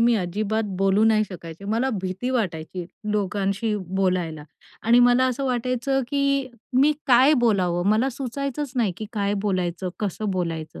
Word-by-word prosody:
मी 235 +1 +4
अजिबात 210 +4 -1 0.2
बोलू 195 +2 +3
नाही 215 -1 +4
शकायचे. 170 0 -9
मला 230 +6 0
भीती 190 +7 -3
वाटायची 180 -6 -2 0.3
लोकांशी 205 +2 -1 0.3
बोलायला 175 -5 0 0.4
आणि 235 +2 +5
मला 250 +1 +4
असं 260 +2 -2
वाटायचं, 255 +1 0
की 280 -2 +1 0.3
मी 300 +2 +5
काय 260 +3 +6
बोलावं, 180 -4 +1
मला 230 +5 +3
सुचायचंच 275 +2 -4
नाही 220 -7 +2
की 215 - -6
काय 205 -1 0
बोलायचं, 185 -1 -1
कसं 210 0 -2
बोलायचं. 165 -4 -3
215 Hz, 145 wpm, -24 LUFS, 185-250 Hz, 0.4 s, काय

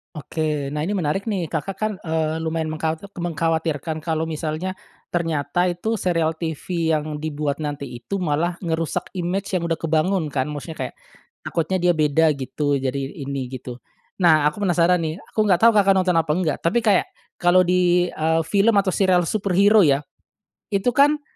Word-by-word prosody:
Oke, 150 -1 -2
nah, 150 - -1
ini 180 - -2
menarik, 190 -1 -1
nih. 195 -6 -2
Kakak, 170 +5 -3
kan, 215 0 0
eee, 160 -1 -1
lumayan 160 0 -1
mengka 160 0 -2 0.2
mengkhawatirkan 160 -2 -2
kalau 160 -1 -1
misalnya, 160 +3 -3 0.3
ternyata 165 +1 0
itu 220 +6 -2
serial 165 -5 0
TV 165 +1 -2
yang 155 -1 -1
dibuat 150 -1 -3
nanti 145 -1 -4
itu 120 +11 -5
malah 170 +1 -1
ngerusak 165 -3 -2
imej 185 +2 -2
yang 175 - 0
udah 165 - 0
kebangun, 165 +2 +1
kan, 145 0 -2
maksudnya 150 +2 -6
kayak, - - -6 0.5
takutnya 175 +3 -1
dia 175 0 +3
beda 155 +1 +3
gitu, 140 +2 -1
jadi 135 0 -1 0.2
ini 135 -1 -4
gitu. 125 0 -8 0.4
Nah, 160 -5 +5
aku 205 - -11
penasaran, 180 -2 +3
nih, 160 -1 -2 0.2
aku - - -4
nggak 180 -3 +4
tahu 230 - +8
Kakak 195 -1 +4
nonton 185 -2 +2
apa 160 -2 0
enggak, 165 -5 0
tapi 225 +8 +1
kayak 205 -4 +3 0.3
kalau 175 +1 +5
di, 180 0 +2
eee, 160 +1 +1
film 200 +6 +2
atau 195 -2 +3
serial 185 -2 +3
superhero, 200 +3 +3
ya. 145 -6 +4 0.7
Itu, 200 +4 +2
kan, 290 +4 +3
165 Hz, 170 wpm, -22 LUFS, 155-185 Hz, 0.7 s, tahu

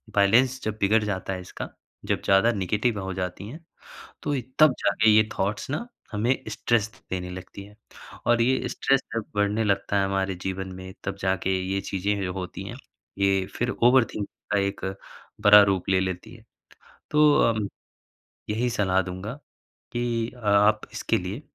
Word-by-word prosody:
Balance 120 +6 +4
जब 110 0 -3
बिगड़ 105 +2 +3
जाता 95 -2 -3
है 90 - -5
इसका 90 - -7 0.4
जब - - 0
ज़्यादा 95 +4 +5
नेगेटिव 105 +2 0
हो 95 0 -4
जाती 90 +2 -4
हैं। 150 +8 -9 0.6
तो 145 - -1
ये 130 - -1 0.2
तब 155 -3 +7
जाके 110 +2 +3
ये 110 0 +5
थॉट्स 100 +6 -1
ना 195 - -2 0.3
हमें 115 +5 +2
स्ट्रेस 115 -2 +1 0.2
देने 90 -1 -3
लगती 95 +2 -9
है। 105 +1 -16 0.5
और 120 -1 +4
ये 130 +2 +1
स्ट्रेस 135 0 +2
जब 115 -2 -2
बढ़ने 105 +2 +1
लगता 100 0 +1
है 100 - +2
हमारे 95 0 -1
जीवन 95 0 -3
में 95 0 -9
तब 95 0 -3
जाके 95 -1 0 0.2
ये 100 - 0
चीज़ें 100 +1 -2
जो 90 - -2
होती 95 0 -5
हैं 120 - -7 0.4
ये 95 -1 +2
फिर 120 0 0
ओवरथिंकिंग 120 -4 +3 0.3
का 105 - +3
एक 100 0 -2 0.6
बड़ा 105 0 +10
रूप 95 -2 0
ले 95 -1 +3
लेती 95 -1 -4
हैं। - - -16 0.7
तो 150 0 +5 0.2
अम, 110 -3 -1 0.8
यही 115 +4 0
सलाह 95 -5 +2
दूँगा 95 +4 -6 0.6
कि 120 -1 -1
अ, - - -14
आप 105 +1 +4
इसके - - 0
लिए 95 +8 -5
100 Hz, 170 wpm, -25 LUFS, 95-115 Hz, 0.8 s, बड़ा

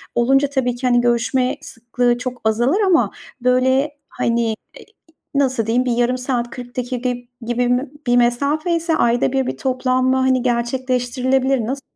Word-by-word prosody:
olunca 270 +4 +3
tabii 255 -3 -1
ki, 250 +1 -2
hani, 245 -1 +4
görüşme 245 +2 +1
sıklığı 240 +1 -1
çok 250 0 -6
azalır 240 - +2
ama 375 -4 +3 0.3
böyle, 260 +4 +2
hani, 235 0 0
eee, 220 -1 -1 0.2
iii, - - -14 0.5
nasıl 260 -5 +1
diyeyim, 245 +3 +1
bir 245 - 0
yarım 245 +1 +1
saat, 250 -2 -2
40 245 0 -10
dakika 250 0 -2
gibi 245 0 -5 0.4
bir 250 +3 +1 0.2
bir 245 0 +4
mesafe 280 +8 +1
ise 330 -1 0
ayda 240 -1 +2
1 265 -1 0
bir - - -3
toplanma, 255 0 +1
hani, 260 -1 +2
gerçekleştirilebilir. 255 +1 0
Nasıl 270 +4 -3
250 Hz, 160 wpm, -19 LUFS, 240-265 Hz, 0.5 s, hani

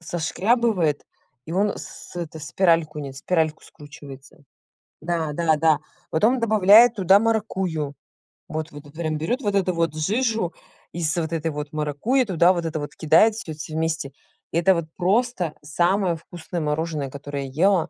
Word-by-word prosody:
сошкрябывает. 175 - 0 0.4
И - - -8
он 200 +2 +2
с - - -10
это 165 -2 -5
спиральку 165 -1 +1
нис 135 -2 -7
спиральку 160 -2 0
скручивается. 145 -1 -13 0.6
Да-да-да. 160 -1 +1 0.3
Потом 225 +10 +3
добавляет 220 +1 +6
туда 195 -1 +5
маракуйю. 190 -9 -1 0.5
Вот 155 -2 -5
во 145 0 -10
тут 145 0 -17
прям 155 -1 -2
берёт 240 - -2
вот 205 -4 -1
эту 185 -2 +1
вот 165 -2 0
жижу 220 +3 0 0.4
из 165 -2 -1
вот 165 0 -2
этой 160 0 -1
вот 150 +1 -6
маракуйи, 155 - 0
туда 180 -2 +4
вот 170 -2 -3
это 160 -1 -2
вот 145 - -7
кидает 165 +8 +4
всё 190 -8 -6
все 155 +1 -8
вместе. 160 -3 -2 0.4
Это 175 +3 +4
вот 170 -1 -2
просто 190 -2 +1
самое 175 +4 +1
вкусное 175 +1 -7
мороженое, 150 -2 -2
которое 140 0 -6
я 140 +6 -2
ела. 190 -5 +3
165 Hz, 150 wpm, -23 LUFS, 155-190 Hz, 0.6 s, добавляет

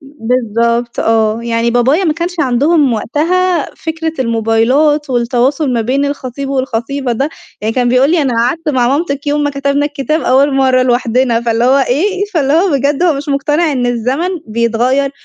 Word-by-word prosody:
بالضبط 235 -3 -2
آه، 225 0 +1
يعني 235 0 0
بابايا 260 +10 +2
ما 315 - +2
كانش 340 +1 -4
عندهم 280 +2 +2
وقتها، 335 +8 0
فكرة 320 0 -4
الموبايلات 250 +6 +1
والتواصل 250 +4 0
ما 235 - 0
بين 265 +5 0
الخطيب 275 -1 -4
والخطيبة 260 0 -2
ده، 270 +6 -1 0.3
يعني 220 +1 -2
كان 245 -1 +1
بيقول 255 +4 +3
لي 335 -3 +2
أنا 265 - 0
قعدت 280 +7 -1
مع 250 -4 +1
مامتِك 280 0 -2
يوم 295 +1 0
ما 290 - 0
كتبنا 280 +1 0
الكتاب 295 +2 -2
أول 270 +2 +2
مَرّة 260 -1 +3
لوحدنا 245 -1 +1
فاللي 230 0 0
هو 265 +3 +4
إيه، 380 +9 0
فاللي 280 -4 +1
هو 350 +5 +3
بجد 280 +2 0
هو 350 -3 +3
مش 285 +2 -6
مقتنع 295 +3 0
إن 250 -2 -1
الزمن 250 +8 -1 0.2
بيتغيّر، 235 +5 0
270 Hz, 170 wpm, -13 LUFS, 240-295 Hz, 0.3 s, هو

